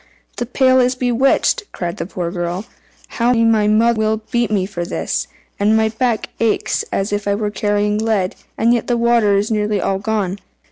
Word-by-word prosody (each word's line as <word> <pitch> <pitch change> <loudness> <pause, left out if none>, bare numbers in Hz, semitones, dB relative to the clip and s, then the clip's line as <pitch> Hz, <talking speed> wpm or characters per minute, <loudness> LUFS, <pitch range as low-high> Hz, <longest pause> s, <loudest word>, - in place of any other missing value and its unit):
"The 240 - -3
pail 260 +1 +3
is 250 0 +2
bewitched!" 250 +1 +2
cried 170 -2 -4
the - - -4
poor 175 -3 -4
girl. 175 +2 -3 0.4
"How 240 +1 +1
my 225 -3 +3
mother 230 +2 +3
will 220 0 0
beat 240 -3 +1
me 200 -3 +1
for 190 -3 -5
this! 170 - -2 0.3
And 210 +2 +3
my 220 0 +2
back 225 0 -1
aches 225 -2 +1
as 195 +2 -1
if 205 0 -2
I 200 - +2
were 210 0 -2
carrying 205 +1 0
lead, 215 -4 0 0.2
and 230 +2 +3
yet 240 - -1
the 240 - +1
water 235 -4 +3
is 205 +3 -1
nearly 210 -1 0
all 190 +2 -1
gone." 205 -2 -2
215 Hz, 190 wpm, -18 LUFS, 200-235 Hz, 0.4 s, pail